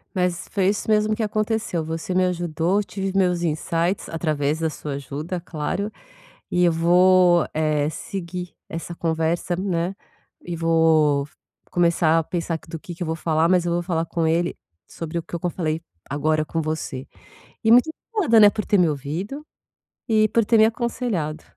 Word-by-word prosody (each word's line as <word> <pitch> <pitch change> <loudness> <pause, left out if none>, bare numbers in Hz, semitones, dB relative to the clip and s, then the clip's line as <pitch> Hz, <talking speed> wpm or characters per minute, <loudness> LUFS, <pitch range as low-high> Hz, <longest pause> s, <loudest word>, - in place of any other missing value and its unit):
Mas 180 -1 -1
foi 190 -2 +1
isso 205 +2 0
mesmo 215 0 +3
que 220 - -2
aconteceu. 215 -5 -1
Você 165 +3 -4
me 185 0 +3
ajudou, 175 +1 0
eu - - 0
tive 195 -1 -4
os 190 - -3
meus 180 -3 +2
insights 170 +3 -1
através 155 -2 -1
da 160 - 0
sua 150 -1 -6
ajuda, 145 +6 -5
claro, 180 +5 -3 0.6
e 180 - +2
eu 170 - +4
vou, 175 +1 +5
eh, 155 -1 +1
seguir 180 +1 -6 0.2
essa 165 +1 -5
conversa, 165 +1 -1
né, 180 0 -1 0.5
e 175 - -4
vou 160 -3 +3 0.4
começar 170 -2 +3
a 165 - -1
pensar 170 -1 -2
que - - -20
do 165 - -6
que 175 - -8
que 170 - -15
eu 175 - -1
vou 160 - -1
falar, 160 +1 +1
mas 180 -2 +3
eu 170 - 0
vou 175 - 0
falar 170 -2 -1
com 165 0 -1
ele 170 +2 +1 0.3
sobre 165 0 -6
o 165 - -2
que 170 - -5
co 175 - -1
eu - - 0
falei 160 -2 -2 0.3
agora 155 +2 +1
com 165 +1 -2
você 150 -4 -4 0.6
e 220 - +4
muito 250 +6 +6 0.2
obrigada, 340 - +3
né, 205 -1 +8
por 210 - -4
ter 205 - +3
me 175 -2 +4
ouvido 160 - -4 0.6
e 215 -2 +3
por 230 +1 +2
ter 225 +2 +3
me 220 - +7
aconselhado. 220 -9 -2
170 Hz, 185 wpm, -23 LUFS, 160-190 Hz, 0.6 s, né